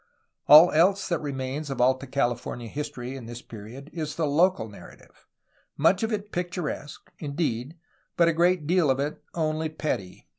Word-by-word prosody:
All 155 +4 +9
else 190 +6 +3
that 170 -3 0
remains 140 +1 -4
of 135 - -4
Alta 130 +2 +2
Cali 135 -2 +1
fornia 120 0 -7
history 130 -1 -5
in 125 -4 -8
this 120 +1 -8
period 115 +6 -10
is 155 -3 -4
the 165 - 0
local 160 -2 +2
narrative, 105 - -15 0.5
much 175 +6 +3
of 225 0 -1
it 210 -1 -3
picturesque, 175 -4 -5
indeed, 145 -1 -3 0.4
but 170 - +5
a 165 - +3
great 175 0 +2
deal 170 -2 +3
of 130 0 +2
it 145 +2 -3
only 155 -1 -1
petty. 125 -12 -4
150 Hz, 170 wpm, -26 LUFS, 130-170 Hz, 0.5 s, All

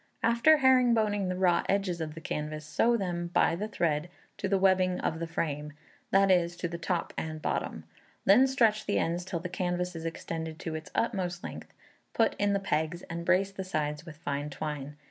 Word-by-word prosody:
After 235 +7 +5
herringboning 235 -7 +3
the 185 - -2
raw 180 -2 +3
edges 190 -4 0
of 155 -1 -4
the 165 - -8
canvas, 150 0 -4
sew 230 +10 +2
them, 175 -4 -2
by 170 -1 +2
the 205 +5 -3
thread, 165 -5 -1 0.3
to 195 - -2
the 195 - +3
webbing 185 -1 +3
of 160 - -1
the 165 - -3
frame, 150 -2 -3 0.4
that 195 0 +4
is, 175 -1 +2
to 175 - -2
the 170 0 -6
top 170 0 -2
and 155 -1 -4
bottom. - - -2 0.4
Then 230 +8 +7
stretch 225 -5 +2
the 205 - +1
ends 170 +2 0
till 180 -2 -3
the 180 - -3
canvas 180 0 -2
is 165 0 -6
extended 160 -1 -5
to 165 - -4
its 160 0 -6
utmost 185 -6 -1
length, - - -8 0.4
put 225 - +3
in 205 0 +2
the 200 - +2
pegs, 165 -2 -1
and 170 0 -4
brace 190 +3 +2
the 195 -1 -5
sides 150 -4 -2
with 160 -3 -11
fine 145 -1 -3
twine. 145 0 -5
175 Hz, 200 wpm, -29 LUFS, 160-195 Hz, 0.4 s, Then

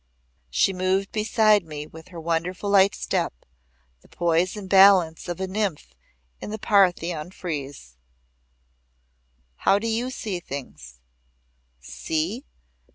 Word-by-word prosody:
She 125 - +2
moved 185 +1 0
beside 215 -1 +3
me 150 -2 -7
with 160 +1 -13
her 175 -2 -10
wonderful 170 +4 -2
light 195 0 +5
step - - -3 0.6
the - - -22
poise 175 +3 0
and 200 -2 -7
balance 190 -4 +5
of 175 - -4
a 190 - -1
nymph 190 -4 -3 0.5
in - - -7
the 215 - -4
Parthenon 180 -6 +1
frieze. 145 - -7 1.6
"How 195 - +3
do 210 - -4
you 230 +3 -1
see 210 -7 -4
things?" 65 - -9 0.8
"See? 160 - -3
185 Hz, 120 wpm, -24 LUFS, 160-200 Hz, 1.6 s, light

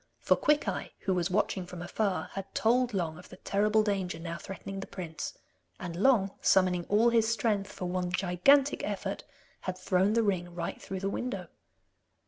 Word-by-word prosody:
For - - +3
Quickeye, 300 0 +1
who 190 - 0
was 175 0 0
watching 190 -1 0
from 175 -1 -7
afar, 200 +1 -1
had 195 0 -7
told 245 +2 +3
Long 170 -6 -2
of 180 - -14
the 185 - -11
terrible 210 +3 +2
danger 195 -5 -1
now 165 0 -5
threatening 195 0 -7
the 195 - -6
prince, 165 -4 -6 0.4
and 170 -2 -5
Long, 200 -1 +3
summoning 185 -2 +3
all 225 +3 +4
his 225 -1 +3
strength 210 -4 0
for 185 - -6
one 180 0 -1
gigantic 195 +10 +3
effort, - - -3 0.4
had 185 -1 -4
thrown 185 +2 +2
the 230 0 +3
ring 175 -4 -1
right 170 -1 -4
through 190 -1 -5
the 195 - -1
window. 195 -9 -4
195 Hz, 175 wpm, -30 LUFS, 180-215 Hz, 0.4 s, all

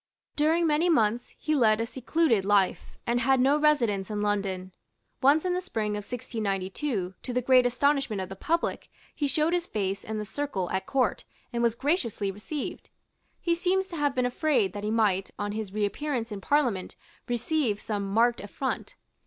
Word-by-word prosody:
During 320 +3 +3
many 320 +3 +3
months 235 -6 +1
be 310 - +2
led 225 -6 +4
a 230 - 0
secluded 255 - +1
life, 200 -1 +1
and 240 +1 +1
had 265 +2 +3
no 275 +4 +4
residence 235 -11 +2
in 210 -1 -2
London. 195 -3 -1 0.5
Once 290 +5 +4
in 360 - +1
the 360 - -1
spring 220 - -2
of 210 - -1
1692, 205 -1 -3
to - - -5
the 250 - +1
great 250 0 +5
astonishment 275 -3 +1
of 185 - -3
the 195 - -8
public, 330 - -1 0.2
he 290 - -1
showed 305 +4 +1
his 350 -1 0
face 195 -2 -2
in 220 0 -4
the 210 - -3
circle 215 -6 -3
at 190 - -2
Court, 265 -2 +1 0.3
and 235 - 0
was 235 -1 +2
graciously 235 - 0
received. 235 +9 -6 0.5
He 340 - +1
seems 370 +3 +1
to 345 - -6
have 290 -2 +1
been 250 -1 +2
afraid 245 - +1
that 205 - -6
he 210 - -1
might, 210 -4 +2
on 205 0 -2
his 215 -2 -4
reappearance 230 +4 -2
in 200 -2 -5
Parliament, 245 -8 +1 0.3
receive 240 -2 0
some 205 -2 -3
marked 235 +3 +3
affront. 255 +6 -4
235 Hz, 180 wpm, -27 LUFS, 205-290 Hz, 0.5 s, great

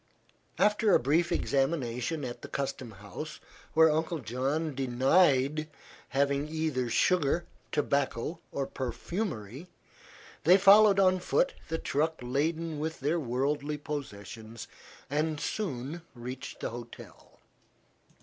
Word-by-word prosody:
After 210 0 +4
a - - +5
brief 160 +7 +2
examination 135 -2 0
at 120 -1 -6
the - - -7
custom 135 -3 -3
house, 110 +9 -8 0.4
where 160 0 +7
Uncle 160 +2 0
John 140 +5 -2
denied 135 +3 +3 0.4
having 140 +1 +1
either 155 -6 -1
sugar, 170 +4 +2 0.3
tobacco 140 +1 0
or 140 - -2
perfumery, 130 - -4 0.8
they 180 +5 +7
followed 200 +1 +7
on 185 -1 +4
foot - - +1
the 165 - -2
truck 160 +1 0
laden 155 +5 -1
with 160 +1 -3
their 155 +5 +1
worldly 145 +3 -1
possessions, 115 -6 -7 0.4
and 150 +2 -1
soon 155 - -3
reached 125 +2 -7
the - - -2
hotel. 120 0 -11
145 Hz, 110 wpm, -30 LUFS, 130-165 Hz, 0.8 s, where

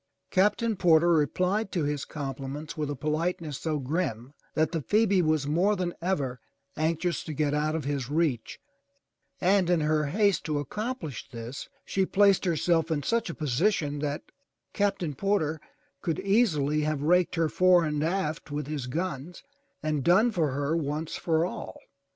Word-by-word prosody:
Captain 210 +4 +2
Porter 170 -2 +4
replied 180 +7 +1
to 170 - 0
his 145 -1 -2
compliments 140 +2 -5
with 150 -2 -2
a 145 - -2
polite 155 +5 -1
ness 150 -5 -6
so 155 -2 -1
grim 135 -3 -3 0.2
that 155 0 +2
the 165 -3 -1
Phoebe 200 +2 +3
was 155 -3 +1
more 175 +8 +2
than 180 -2 -2
ever 140 -9 -1 0.4
anxious 165 +2 0
to 155 - -5
get 145 0 +1
out 155 +1 0
of 160 - -2
his 140 -3 -2
reach 145 -7 -1 0.8
and 190 -1 +3
in 175 -2 +3
her 155 0 +1
haste 200 +5 +2
to 155 -2 -1
accomplish 165 - -4
this, 115 +3 -7 0.2
she 195 - 0
placed 200 -1 +4
herself 165 -1 +1
in 150 -3 -1
such 230 -5 0
a 170 - -5
position 150 - 0
that 145 0 -2 0.5
Captain 195 -6 0
Porter 160 -2 0 0.4
could 165 -5 -1
easily 155 - +2
have 150 -1 -1
raked 180 +3 +3
her 165 -1 +2
fore 180 +1 +4
and 150 -1 -1
aft 160 -3 -2
with 145 0 -3
his 145 -3 -4
guns 165 - -4 0.4
and 155 -3 0
done 205 - +4
for 165 -7 +1
her 145 +3 0
once 155 0 -2
for 165 0 +1
all. 180 - -6
160 Hz, 165 wpm, -28 LUFS, 145-180 Hz, 0.8 s, Porter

